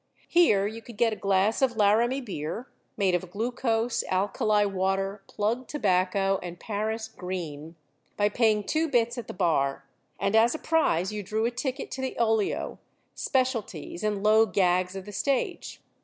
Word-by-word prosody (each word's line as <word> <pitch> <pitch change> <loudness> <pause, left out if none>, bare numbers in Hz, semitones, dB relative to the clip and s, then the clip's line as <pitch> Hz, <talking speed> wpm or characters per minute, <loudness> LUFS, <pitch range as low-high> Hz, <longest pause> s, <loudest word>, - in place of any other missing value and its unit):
Here 215 - +4
you 220 +2 -5
could 230 -2 -12
get 230 -1 +3
a - - -3
glass 200 +3 +1
of 260 -3 +2
Laramie 230 +6 +3
beer, 205 - -5 0.3
made 195 -3 +2
of 180 0 -1
glucose, 230 +2 -1
alkali 205 +2 +2
water, 195 +1 -1
plug 230 +5 -2
tobacco, 195 -5 +1
and 175 -1 -7
Paris 220 +1 -3
green, 165 -4 -6 0.4
by 205 - +3
paying 215 -1 +2
two 320 +8 0
bits 240 -3 +1
at 235 - -8
the - - -6
bar, 140 -6 +1 0.3
and, 200 +2 +1
as 230 +5 +5
a - - -2
prize, 215 - +1
you 210 - -3
drew 215 +3 -1
a 235 - +1
ticket 265 +2 -4
to 260 - -4
the 260 - -3
olio, 225 -3 0 0.3
specialties, 230 - -2
and 210 -2 -1
low 220 +1 +5
gags 180 -1 +1
of 190 -1 -6
the 205 - -8
stage. 265 +6 -2
210 Hz, 165 wpm, -27 LUFS, 190-235 Hz, 0.4 s, as